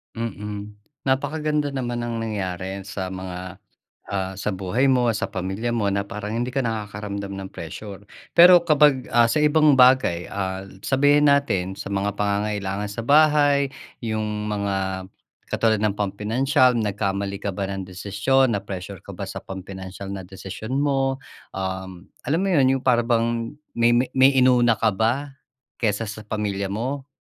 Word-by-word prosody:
Mm. 105 -2 -5 0.3
Napakaganda 150 +1 0
naman 120 -2 -2
ng 120 -1 -3
nangyari 95 -3 -3
sa 95 -3 -4
mga, 95 0 -7 0.5
ah 95 -1 -2
sa 105 - -2
buhay 95 +8 0
mo, 125 -2 +3
sa - - -1
pamilya 95 +5 -3
mo 105 -4 0
na 100 0 0
parang 105 +1 -5
hindi 120 +2 -2
ka 135 - 0
nakakaramdam 105 -3 -4
ng 95 0 -6
pressure. 100 +5 -8 0.3
Pero 175 +1 +10
kapag, 145 -4 +4
ah, 120 0 +5
sa 150 - +1
ibang 150 -1 +5
bagay, 125 -9 +5
ah, 95 -1 -4 0.2
sabihin 145 +2 +4
natin 95 -10 +1
sa - - -5
mga 100 0 -1
pangangailangan 100 -1 -1
sa 115 - -4
bahay. 145 -2 +4 0.3
'Yong 105 -1 -2
mga 95 -2 -2 0.4
katulad 110 -2 +1
ng 105 -2 +1
pampinansiyal, 120 +6 +2
nagkamali 100 -2 -2
ka 100 - -2
ba 100 - -2
ng 95 -1 -5
desisyon? 105 +8 +1
Na-pressure 100 -1 -5
ka 100 -2 -10
ba 100 - -5
sa 95 - -6
pampinansiyal 95 0 -8
na 95 -2 -6
desisyon 100 +6 -6
mo? 135 -2 +1 0.4
Um, 95 -1 -5 0.2
alam 160 +4 +2
mo 195 - +1
'yon, 140 -6 +4
'yong 130 - -10
para 120 -2 +4
bang 115 +1 0 0.2
may 115 0 +4
may 125 +1 +1
may 135 +1 +6
inuna 125 -3 +5
ka 110 0 +2
ba, 125 +7 0 0.5
kaysa 110 0 +1
sa 105 +1 -7
pamilya 105 -2 -2
mo, 130 +7 -3
105 Hz, 155 wpm, -23 LUFS, 100-130 Hz, 0.5 s, Pero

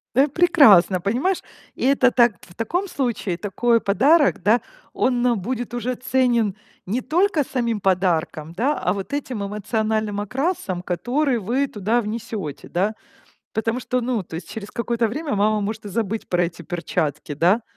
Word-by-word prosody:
Э, 275 +3 +5
прекрасно, 265 - +5
понимаешь? 255 - 0 0.3
И - - -4
это 265 -2 +4
так 240 -4 +4
в 175 - -16
таком 350 +12 -1
случае 235 - -2
такой 230 +4 +1
подарок, 270 - +3
да, 220 +5 +4 0.3
он 245 -2 +1
будет 240 +3 -4
уже 245 +1 -2
ценен 245 -5 +1 0.3
не 220 +7 -1
только 330 +3 +1
самим 235 -5 -1
подарком, 175 -4 0
да, 260 - 0
а 180 - 0
вот 200 +5 -6
этим 255 -7 -3
эмоциональным 215 0 -1
окрасом, 250 - -2
который 245 - 0
вы 245 +7 0
туда 220 0 0
внесёте, 215 - -5
да? 200 +5 0 0.6
Потому 225 +3 -1
что, 250 0 -1
ну, 240 -3 -1
то 165 - -12
есть 165 0 -8
через 210 -2 -7
какое-то 235 -1 -1
время 285 +4 -3
мама 210 +1 +2
может 215 +1 -4
и - - -5
забыть 220 +1 -3
про 175 0 +2
эти 170 0 -6
перчатки, 165 -3 -3
да? 185 +10 +3
225 Hz, 160 wpm, -22 LUFS, 195-255 Hz, 0.6 s, Э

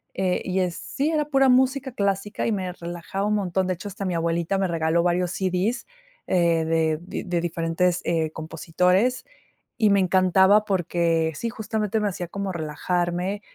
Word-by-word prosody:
eh, 185 -1 0
y 185 0 0
es 180 -2 -1
sí, 295 +4 -2
era 300 -2 +1
pura 270 -2 +3
música 260 +1 +3
clásica 200 -1 -1
y - - +1
me 185 -4 -2
relajaba 175 +3 -5
un 210 - +1
montón, 190 -2 0
de 185 - 0
hecho, 190 +4 -8
hasta 200 0 -6
mi 180 -2 -1
abuelita 170 +3 0
me 190 0 +1
regaló 165 0 +1
varios 180 0 +1
CD, 190 +6 -1 0.4
eh, 170 -2 +2
de 160 -1 +1 0.3
de 175 -2 -1
diferentes, 170 +1 0
eh, 160 -2 0
compositores 180 +9 0 0.5
y 220 -3 +4
me 200 -1 +4
encantaba 190 +3 +4
porque, 170 -4 +1
sí, 230 +10 -3
justamente, 220 -1 -2
me 210 - +1
hacía 175 -1 -5
como 195 +2 -4
relajarme. 175 +4 -2
185 Hz, 170 wpm, -24 LUFS, 170-205 Hz, 0.5 s, y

